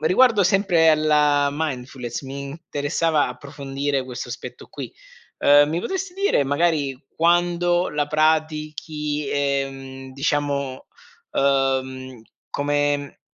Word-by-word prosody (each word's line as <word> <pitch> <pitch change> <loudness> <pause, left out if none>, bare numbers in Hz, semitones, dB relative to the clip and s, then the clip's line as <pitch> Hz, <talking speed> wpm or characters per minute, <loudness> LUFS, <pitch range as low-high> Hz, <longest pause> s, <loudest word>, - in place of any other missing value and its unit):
riguardo 215 +6 +4
sempre 185 -4 +4
alla 150 -2 +3
mindfulness, 130 -5 -4
mi 135 +1 -6
interessava 145 +1 -1
approfondire 140 +1 -3
questo 125 -1 -6
aspetto - - -8
qui, - - -7 0.5
uhm, 145 +1 +6
mi 165 +3 -1
potresti 380 - -4
dire, 390 - +2
magari 145 -2 +1 0.2
quando 175 +1 +2
la 150 -1 0
pratichi, 155 -1 -1
ehm, 135 -2 -2
diciamo, 140 -1 -1 0.5
uhm, 130 -2 0 0.3
come 145 -1 -1
145 Hz, 100 wpm, -22 LUFS, 135-160 Hz, 0.5 s, uhm